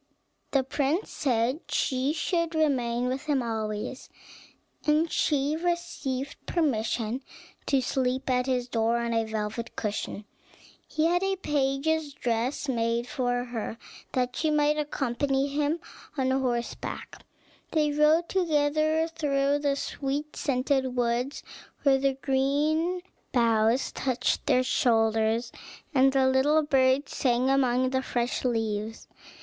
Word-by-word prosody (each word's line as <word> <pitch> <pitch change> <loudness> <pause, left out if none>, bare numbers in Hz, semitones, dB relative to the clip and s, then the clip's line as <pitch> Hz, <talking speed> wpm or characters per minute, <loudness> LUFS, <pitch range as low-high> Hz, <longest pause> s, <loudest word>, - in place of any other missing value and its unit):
The 275 -2 +2
prince 285 +7 -1
said 255 0 0
she 260 +2 +1
should 335 +1 -1
remain 250 -6 +1
with 260 +3 -3
him 285 -4 +1
always, 220 +2 -4 0.8
and 310 +2 +3
she 290 0 +1
received 315 -6 -3
permission 240 -6 0 0.5
to 270 -2 +3
sleep 255 0 -1
at 250 0 +1
his 250 -2 0
door, 230 -1 +1
on 235 0 -1
a 225 0 +1
velvet 220 +1 -4
cushion. 210 -1 -3 0.6
He 315 - 0
had 350 +2 +3
a 390 0 +1
page's 290 -2 0
dress 240 +3 -1
made 235 -2 0
for 245 -1 -1
her, 230 -2 -5 0.4
that 250 -1 0
she 315 - 0
might 300 0 +3
accompany 275 -1 0
him 295 +3 0 0.4
on 260 -1 +1
horseback. 250 -3 -3 0.5
They 305 -2 +2
rode 305 +3 +4
together 310 -2 +1
through 290 -3 0
the 285 -1 +1
sweet 285 +2 -3
scented 265 -1 0
woods, 245 +3 -1 0.4
where 275 -2 +4
the 275 0 +2
green 295 +6 +1 0.3
boughs 230 0 +2
touched 255 -2 -1
their 255 - +4
shoulders, 225 -1 +2 0.4
and 270 0 +5
the 265 -1 +3
little 285 +4 +3
birds 265 -1 +2
sang 255 0 +2
among 255 -1 +2
the 260 0 +1
fresh 240 -2 -2
leaves. 225 -2 -2
265 Hz, 125 wpm, -27 LUFS, 240-295 Hz, 0.8 s, and